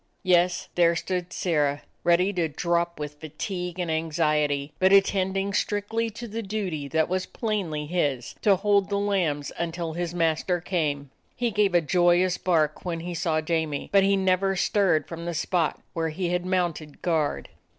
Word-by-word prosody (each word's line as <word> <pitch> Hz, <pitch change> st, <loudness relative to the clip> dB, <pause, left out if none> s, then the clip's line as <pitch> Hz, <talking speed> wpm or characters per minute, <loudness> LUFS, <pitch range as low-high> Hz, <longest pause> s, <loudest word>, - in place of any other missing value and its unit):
Yes, 180 Hz, -1 st, +2 dB
there 170 Hz, -1 st, +4 dB
stood 180 Hz, +1 st, -3 dB
Sirrah, 145 Hz, -6 st, 0 dB, 0.2 s
ready 180 Hz, +3 st, +3 dB
to 175 Hz, -3 st, 0 dB
drop 170 Hz, +2 st, -1 dB
with 150 Hz, 0 st, -6 dB
fatigue 180 Hz, +3 st, -5 dB
and 175 Hz, -3 st, -2 dB
anxiety, 150 Hz, -3 st, 0 dB
but 190 Hz, 0 st, +4 dB
attending 195 Hz, 0 st, +3 dB
strictly 210 Hz, +3 st, -1 dB
to 235 Hz, +2 st, -8 dB
the 225 Hz, +1 st, -4 dB
duty 190 Hz, -8 st, -3 dB
that 160 Hz, +2 st, +1 dB
was 185 Hz, +1 st, -2 dB
plainly 190 Hz, -10 st, -2 dB
his, 145 Hz, -7 st, -1 dB
to 200 Hz, -2 st, +5 dB
hold 200 Hz, 0 st, +2 dB
the 200 Hz, -, 0 dB
lambs 180 Hz, -8 st, 0 dB
until 170 Hz, -1 st, -3 dB
his 175 Hz, +1 st, -3 dB
master 170 Hz, +1 st, +1 dB
came. 150 Hz, -6 st, -2 dB, 0.2 s
He 240 Hz, -2 st, -1 dB
gave 205 Hz, -3 st, +2 dB
a 175 Hz, -, +5 dB
joyous 175 Hz, +2 st, +3 dB
bark 155 Hz, -4 st, +1 dB
when 170 Hz, -2 st, -3 dB
he 175 Hz, +1 st, -5 dB
saw 160 Hz, -1 st, 0 dB
Jamie, 155 Hz, -3 st, -2 dB
but 200 Hz, -, +6 dB
he 195 Hz, 0 st, +3 dB
never 190 Hz, 0 st, +2 dB
stirred 185 Hz, -5 st, +2 dB
from 170 Hz, 0 st, -7 dB
the 170 Hz, -1 st, -3 dB
spot 165 Hz, 0 st, 0 dB
where 165 Hz, -1 st, -1 dB
he 175 Hz, +3 st, -2 dB
had 180 Hz, +1 st, -1 dB
mounted 175 Hz, -5 st, -2 dB
guard. 160 Hz, -4 st, 0 dB
175 Hz, 170 wpm, -26 LUFS, 160-190 Hz, 0.2 s, but